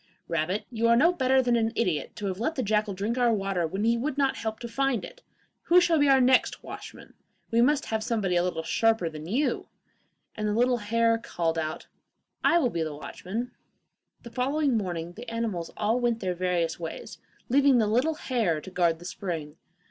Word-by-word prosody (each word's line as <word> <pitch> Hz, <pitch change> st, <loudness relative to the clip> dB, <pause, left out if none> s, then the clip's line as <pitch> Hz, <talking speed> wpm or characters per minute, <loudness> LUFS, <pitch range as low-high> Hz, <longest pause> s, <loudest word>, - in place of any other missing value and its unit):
'Rabbit, 170 Hz, +5 st, -1 dB
you 230 Hz, -1 st, +1 dB
are 235 Hz, -, +5 dB
no 325 Hz, +9 st, +5 dB
better 265 Hz, -4 st, +3 dB
than 245 Hz, -1 st, +2 dB
an 225 Hz, -1 st, +1 dB
idiot 180 Hz, -9 st, -1 dB
to 210 Hz, -, -5 dB
have 190 Hz, -1 st, -3 dB
let 315 Hz, +8 st, -1 dB
the 260 Hz, -, -1 dB
jackal 210 Hz, -1 st, 0 dB
drink 215 Hz, +6 st, -2 dB
our 240 Hz, -1 st, +4 dB
water 195 Hz, -5 st, 0 dB
when 190 Hz, +6 st, -3 dB
he 230 Hz, +1 st, +2 dB
would 280 Hz, +2 st, -2 dB
not 275 Hz, -2 st, +2 dB
help 220 Hz, -1 st, -3 dB
to 240 Hz, -, -6 dB
find 270 Hz, 0 st, 0 dB
it. -, -, -13 dB, 0.4 s
Who 355 Hz, +1 st, +6 dB
shall 345 Hz, -3 st, +3 dB
be 290 Hz, -1 st, +4 dB
our 270 Hz, -1 st, +6 dB
next 255 Hz, 0 st, +3 dB
watchman? -, -, -10 dB, 0.4 s
We 230 Hz, +1 st, +4 dB
must 290 Hz, +4 st, +3 dB
have 220 Hz, -1 st, -2 dB
somebody 215 Hz, -6 st, 0 dB
a 175 Hz, -, +4 dB
little 170 Hz, -2 st, -2 dB
sharper 225 Hz, 0 st, +1 dB
than 155 Hz, 0 st, -8 dB
you!' 260 Hz, -, 0 dB, 0.7 s
and 215 Hz, -1 st, -2 dB
the 210 Hz, -, 0 dB
little 245 Hz, +1 st, +3 dB
hare 230 Hz, +1 st, +1 dB
called 165 Hz, -7 st, -2 dB
out, 155 Hz, 0 st, -4 dB, 0.6 s
'I 340 Hz, -, +5 dB
will 260 Hz, -8 st, +2 dB
be 170 Hz, -, -2 dB
the 155 Hz, -2 st, -3 dB
watchman.' 190 Hz, -, -5 dB, 0.7 s
The 235 Hz, -, -10 dB
following 275 Hz, +2 st, 0 dB
morning 175 Hz, -5 st, -3 dB
the 235 Hz, +5 st, -9 dB
animals 225 Hz, -7 st, -3 dB
all 220 Hz, +4 st, +1 dB
went 240 Hz, -2 st, 0 dB
their 185 Hz, -3 st, -1 dB
various 175 Hz, -2 st, -1 dB
ways, 165 Hz, -1 st, -7 dB, 0.3 s
leaving 275 Hz, 0 st, +4 dB
the 225 Hz, -, +3 dB
little 250 Hz, +9 st, +1 dB
hare 225 Hz, -, 0 dB
to 190 Hz, -, -11 dB
guard 170 Hz, -2 st, +2 dB
the 175 Hz, -, -13 dB
spring. 165 Hz, -5 st, -5 dB
225 Hz, 205 wpm, -27 LUFS, 180-250 Hz, 0.7 s, Who